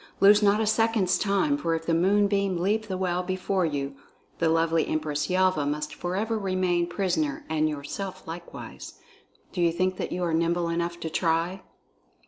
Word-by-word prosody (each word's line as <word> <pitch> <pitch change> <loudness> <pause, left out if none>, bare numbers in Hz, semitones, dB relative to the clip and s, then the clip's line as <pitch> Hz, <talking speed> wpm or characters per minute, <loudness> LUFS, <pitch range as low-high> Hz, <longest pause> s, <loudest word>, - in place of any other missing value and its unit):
Lose 205 +2 +7
not 205 0 +4
a 220 - +1
second's 220 -3 +2
time, 210 +9 +1
for 165 - 0
if 165 0 -5
the 165 - +1
moonbeam 200 +2 +2
leave 210 +5 0
the 190 -2 -3
well 180 -1 0
before 185 0 -1
you, 140 -2 -3 0.5
the 165 - +2
lovely 165 0 +2
Empress 150 -1 -1
Yelva 185 -4 +2
must 150 +1 -2
forever 210 +5 -2
remain 185 -3 0
prisoner 175 -6 -1
and 155 -1 +1
yourself 155 +6 -6
likewise. 170 +1 -8 0.6
Do 180 - -2
you 170 -1 +4
think 185 +2 0
that - - -4
you 180 - -2
are 170 -2 0
nimble 170 +1 +1
enough 170 0 -2
to 160 - -3
try?" 165 +3 0
175 Hz, 170 wpm, -26 LUFS, 165-195 Hz, 0.6 s, Lose